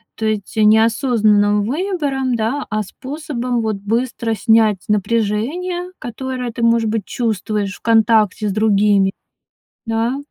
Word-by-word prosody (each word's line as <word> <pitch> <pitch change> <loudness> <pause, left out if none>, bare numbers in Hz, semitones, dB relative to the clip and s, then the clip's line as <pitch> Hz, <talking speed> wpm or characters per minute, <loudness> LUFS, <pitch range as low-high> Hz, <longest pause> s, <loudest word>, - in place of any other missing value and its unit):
То 220 - -4
есть 215 -2 -2
не 215 0 +5
осознанным 215 -3 +2
выбором, 280 - -1
да, 235 +6 -2
а 215 0 -1
способом, 255 0 -4
вот, 220 -1 -1
быстро 230 +2 -2
снять 220 -2 +3
напряжение, 230 - -1
которое 250 +1 -5
ты, 235 - -7
может 230 -1 +3
быть, 215 -3 -2
чувствуешь 210 -2 -2
в - - -17
контакте 220 -2 +3
с - - -1
другими. 205 -2 +3 0.8
Да. 225 +3 0
225 Hz, 130 wpm, -18 LUFS, 210-250 Hz, 0.8 s, не